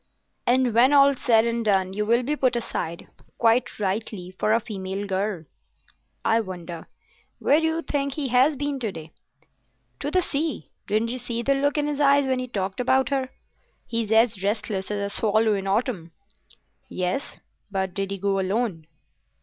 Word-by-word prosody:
"And 250 -1 +3
when 250 +5 +5
all's 280 -1 +5
said 230 -4 +4
and 235 0 -1
done, 190 -3 +1
you 210 +1 -2
will 235 +2 +3
be 295 +5 -1
put 255 -4 +1
aside—quite 230 +4 -2
rightly—for 195 -1 -2
a 225 - +4
female 195 -3 -5
girl." 195 -2 -2 0.8
"I 225 - +4
wonder... 175 -4 -7 0.5
Where 290 - +3
do 320 - +1
you 325 +1 -1
think 280 -1 -1
he 280 -3 -3
has 260 +5 +4
been 285 0 -2
to 225 -5 -2
day?" 160 -3 -10 0.9
"To 285 - -2
the 365 +3 +2
sea. 300 - -2 0.2
Didn't 220 +2 +1
you 255 - -3
see 235 -1 -4
the 275 - +3
look 285 +2 +1
in 295 - +1
his 295 -1 -2
eyes 280 -1 +5
when 260 -1 0
he 255 - -3
talked 195 -4 -3
about 260 +1 +2
her? 265 -2 -1 0.6
He's 230 -2 -2
as 225 -3 +3
restless 205 -1 -2
as 200 -1 -2
a - - -8
swallow 220 0 +2
in 195 -1 -2
autumn." 195 -5 -1 0.8
"Yes; 185 +9 -3 0.3
but 190 -2 -2
did 195 0 -2
he 195 - -3
go 195 0 0
alone?" 190 -4 -1
225 Hz, 175 wpm, -25 LUFS, 195-265 Hz, 0.9 s, when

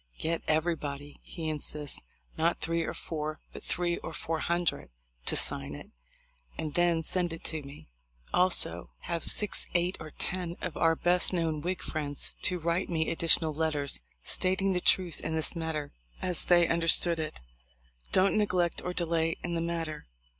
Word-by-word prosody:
"Get 165 +1 -1
everybody," 150 -3 -2
he 165 -3 -7
insists, 150 -1 -3 0.3
"(not 165 +2 +1
three 165 +1 -1
or 165 - -3
four, 155 -1 -4 0.2
but - - -9
three 175 -1 -1
or - - -7
four 160 0 -3
hundred) 175 +1 -1 0.4
to - - +3
sign - - +5
it, - - -11 0.7
and 155 -2 -4
then 170 -1 +2
send 175 -1 -2
to 160 -1 -1
me. 140 +1 -12 0.5
Also 180 0 +1
have 170 -1 -3
six, 210 -2 0
eight, 175 +2 +1
or 155 - -8
ten 175 +1 -4
of 165 - -5
our 165 0 +3
best 180 +3 +5
known 165 -3 0
Whig 180 +3 -3
friends 145 -2 -2
to 180 - 0
write 170 +2 -1
me 160 -2 0
additional 165 -1 +6
letters, 150 - -1 0.2
stating 190 +1 +1
the 180 - -1
truth 180 -2 +3
in 160 - -3
this 160 +2 0
matter 160 -3 -3 0.3
as 180 -2 +1
they 175 -1 +5
un 165 0 0
derstood 165 0 +3
it. 155 -1 -4 0.7
Don't 190 +1 +3
neglect 180 -4 +1
or 180 - -3
delay 165 -1 0
in 175 - -3
the 165 - -1
matter. 165 -2 -4
165 Hz, 165 wpm, -29 LUFS, 155-175 Hz, 0.7 s, additional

